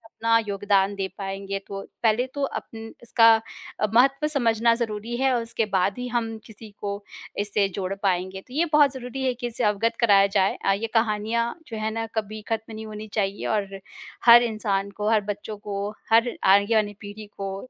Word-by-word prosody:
अपना 230 0 +3
योगदान 200 0 +1
दे 195 -1 -2
पाएँगे 195 0 -4
तो, 195 0 -6 0.2
पहले 225 +2 +3
तो 285 - -4
अपन 225 -4 -6
इसका 230 -1 +5 0.5
अ, 215 - +2
महत्व 275 +5 +4
समझना 235 -5 +2
ज़रूरी 230 0 -3
है 265 0 +2
और 235 - 0
उसके 230 -1 -2
बाद 190 +4 +1
ही 250 - -4
हम 230 -2 -2
किसी 220 0 -12
को 200 0 -4 0.4
इससे 205 0 +1
जोड़ 190 -1 -2
पाएँगे, 185 0 -1
तो 250 - -17
ये 320 +5 +2
बहुत 290 -2 +6
ज़रूरी 260 0 -6
है 255 -1 +1
कि 245 0 -5
इससे 235 +1 -4
अवगत 220 +2 +1
कराया 200 -4 +5
जाए 195 -1 +1
अ, 195 - +4
ये 225 +3 -2
कहानियाँ 225 +1 +1
जो 225 - -6
हैं 215 0 -2
ना 225 +1 -3
कभी 215 0 -3
खत्म 225 0 -3
नहीं 220 0 -7
होनी 215 0 -8
चाहिए 200 -2 -1
और 200 -2 -2 0.5
हर 240 0 +9
इंसान 210 -4 -1
को, 210 +2 -2
हर 220 -2 +3
बच्चों 205 +1 -5
को, 200 0 -4 0.2
हर 230 +2 +5
आगे 200 +3 +4
आने 205 -1 -2
पीढ़ी 210 +1 -9
को 195 -1 -4
215 Hz, 195 wpm, -24 LUFS, 200-235 Hz, 0.5 s, हर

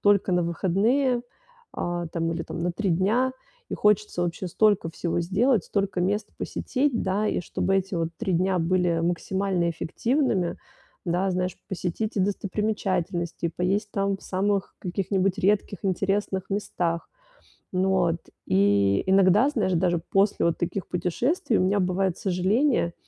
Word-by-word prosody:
только 200 -2 +3
на 175 0 +3
выходные, 220 +10 +1 0.5
а, 175 0 -2
там, 165 0 -2
или, 165 - -3
там, - - -7
на 175 +1 -1
3 200 +3 -2
дня 215 +10 +2 0.4
и - - -1
хочется 210 -3 +2
вообще 175 +1 -3
столько 205 -3 +2
всего 170 +1 -2
сделать, 205 +5 +2
столько 195 -3 -1
мест 205 +3 0
посетить, 265 -2 -1
да. 200 +3 0
И - - 0
чтобы 190 +2 -1
эти 190 0 -1
вот 165 -1 -1
3 195 -6 -1
дня 185 +1 +1
были 170 0 +1
максимально 175 +1 0
эффективными, 195 - 0 0.5
да, 180 +3 +1
знаешь, 180 0 -1
посетить 190 +4 -3
и - - +2
достопримечательности, 190 -4 -1
и - - 0
поесть 195 +5 -1
там 195 -1 0
в - - -20
самых 195 +1 -1
каких-нибудь 190 +1 -1
редких 200 0 +1
интересных 195 0 -1
местах. 175 -4 -2 0.7
Ну, 185 0 +2
от, 165 0 0 0.3
и, 100 +1 +3
иногда, 195 +6 +5
знаешь, 215 -10 0
даже 175 0 +2
после 195 -1 +3
вот 170 -1 +1
таких 175 +2 -3
путешествий 220 - 0
у - - +2
меня 200 +2 +2
бывает 185 0 0
сожаления. 195 - +1
190 Hz, 150 wpm, -25 LUFS, 175-205 Hz, 0.7 s, иногда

